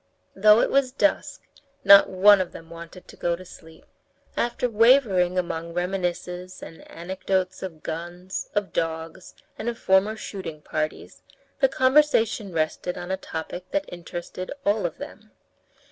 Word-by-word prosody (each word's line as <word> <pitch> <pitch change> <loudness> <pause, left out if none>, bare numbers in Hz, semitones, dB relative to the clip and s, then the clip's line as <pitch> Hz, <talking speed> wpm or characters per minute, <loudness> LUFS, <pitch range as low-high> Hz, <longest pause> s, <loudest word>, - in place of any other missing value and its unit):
Though 210 +3 +6
it - - 0
was 275 -2 +2
dusk, 295 +3 0 0.4
not 200 0 +8
one 195 +1 +6
of 180 - -5
them 165 0 -12
wanted 170 +2 -11
to - - -13
go 170 0 -1
to 185 +2 -12
sleep. 160 -2 -15 0.5
After 240 +1 0
wavering 220 -6 +4
among 170 -2 -3
reminiscences 180 0 -3
and 165 - -12
anecdotes 185 +1 -3
of 165 -5 -8
guns, 175 +3 -6
of 205 -2 -1
dogs, 165 +2 -4 0.2
and 225 - -2
of 235 - -5
former 190 +2 +2
shooting 170 -8 -7
parties, 155 0 -4 0.4
the - - +4
conversation 260 - +2
rested 165 +2 -2
on 175 +1 -6
a - - +1
topic 175 0 -7
that 295 0 -1
interested 175 +1 -7
all 205 -2 +2
of 165 - -11
them. 215 +1 -10
185 Hz, 145 wpm, -24 LUFS, 170-210 Hz, 0.5 s, not